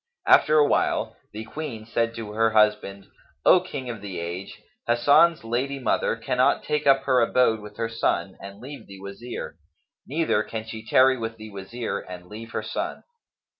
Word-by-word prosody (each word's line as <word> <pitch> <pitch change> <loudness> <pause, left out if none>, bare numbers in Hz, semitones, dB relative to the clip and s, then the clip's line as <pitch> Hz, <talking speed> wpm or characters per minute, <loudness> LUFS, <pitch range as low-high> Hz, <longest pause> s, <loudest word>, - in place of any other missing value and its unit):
After 365 - +5
awhile 145 -1 +2 0.2
the 110 +1 -6
Queen 115 -4 -6
said 115 0 -1
to 110 -2 -6
her 115 +1 +2
husband, 105 -2 +2 0.4
"O 185 - +7
King 145 -8 -7
of 115 -4 -6
the 95 -4 -6
age, 85 +3 -6 0.3
Hasan's 145 +8 +4
lady 125 +5 -2
mother 130 - 0
cannot 125 +4 +1
take 150 -1 -1
up 135 -1 +5
her 130 -2 +3
abode 115 -1 +3
with 105 0 -12
her 115 0 -1
son 95 -5 -1
and 100 +1 -10
leave 135 +4 -10
the 95 -1 -11
Wazir; 100 +5 -7 0.5
neither 150 -7 +1
can 110 0 -5
she 110 0 -8
tarry 130 +3 +4
with 115 0 -4
the 110 -1 -10
Wazir 105 +4 -4
and 90 -1 -10
leave 110 +4 -9
her - - -4
son." - - -4
115 Hz, 170 wpm, -25 LUFS, 105-130 Hz, 0.5 s, O